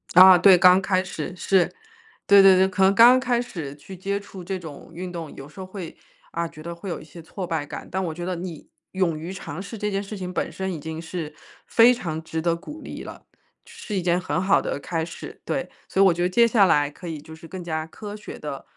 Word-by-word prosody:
啊， 185 +1 +10
对， 190 0 +7
刚 180 +2 +6
开 190 -1 +1
始， 180 -1 -6
是。 185 -1 +2 0.5
对 200 -1 +7
对 195 -1 +8
对， 190 +1 +4
可 190 0 0
能 190 +1 +5
刚 240 +4 +8
开 245 -2 +1
始 160 - -7
去 180 +6 -11
接 200 +2 -2
触 195 -2 -11
这 190 +1 -4
种 155 -4 -11
运 180 +1 -6
动， 165 -3 -7
有 135 +1 -10
时 170 - -14
候 185 - -5
会 185 -3 -8 0.3
啊， 170 0 -2
觉 160 -2 -13
得 170 +2 -6
会 170 +4 -10
有 175 - -4
一 - - -11
些 160 +2 -13
挫 185 +3 -6
败 160 -3 -2
感， - - -8
但 190 +1 -1
我 165 - -3
觉 175 +2 -7
得 185 0 -2
你 170 -3 -7 0.2
勇 180 -4 0
于 170 +4 -6
尝 175 -4 -7
试 200 +2 -7
这 210 - -1
件 195 -1 -1
事 205 +1 -7
情 180 -2 -5
本 - - -2
身， 190 0 -4
已 165 - -5
经 160 +2 -6
是 160 -2 -6 0.3
非 235 +1 +6
常 170 -10 -3
值 160 0 -4
得 165 +1 +1
鼓 300 - -10
励 - - -7
了， - - -11 0.4
是 210 - -7
一 185 - 0
件 175 +1 +2
很 150 -2 -1
好 190 +2 +3
的 - - -3
开 165 +1 -3
始， 170 - -9
对。 - - -3 0.2
所 195 - +1
以 - - +7
我 190 - +5
觉 175 - -4
得 180 - +2
接 235 +5 +5
下 215 -4 +5
来， 145 -4 +3
可 175 +4 -10
以 160 -2 -5
就 160 +2 -12
是 160 +1 -13
更 185 +1 -7
加 160 -1 -3
科 210 +4 -8
学 210 - -9
地 145 -2 -6
180 Hz, 275 characters per minute, -24 LUFS, 165-195 Hz, 0.5 s, 啊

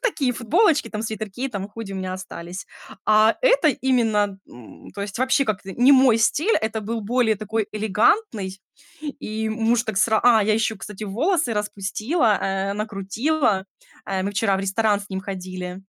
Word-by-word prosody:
такие 285 - 0
футболочки 305 - +2
там, 215 0 -4
свитерки 220 +3 -4
там, 200 -4 -5
худи 210 -2 -8
у - - -5
меня 185 -1 -4
остались. 185 -1 -7 0.4
А, 215 +1 +5
это - - +4
именно, 225 -7 +1
м, 120 -2 -14
то 200 - -6
есть 200 +2 -6
вообще 260 +2 +2
как-то 195 -3 -3
не 250 +6 +4
мой 260 -4 +5
стиль, 310 - +2
это 220 0 -2
был 225 +2 -3
более 225 +1 +1
такой 215 +1 -2
элегантный. 210 - +1 0.6
И 220 +1 -3
муж 225 +1 +1
так 220 -4 -5
сра 220 +1 +3
А, 230 -3 +6
я 215 0 +2
ещё, 220 -1 0
кстати, 210 +1 -8
волосы 270 - 0
распустила, 210 - 0
э, 195 0 -1
накрутила. 215 +3 -1 0.4
Э, 190 -1 -1
мы 200 - -2
вчера 200 -1 +1
в - - -3
ресторан 205 +1 +1
с 200 - -11
ним 190 0 -3
ходили. 185 -1 -6
215 Hz, 170 wpm, -23 LUFS, 195-240 Hz, 0.6 s, А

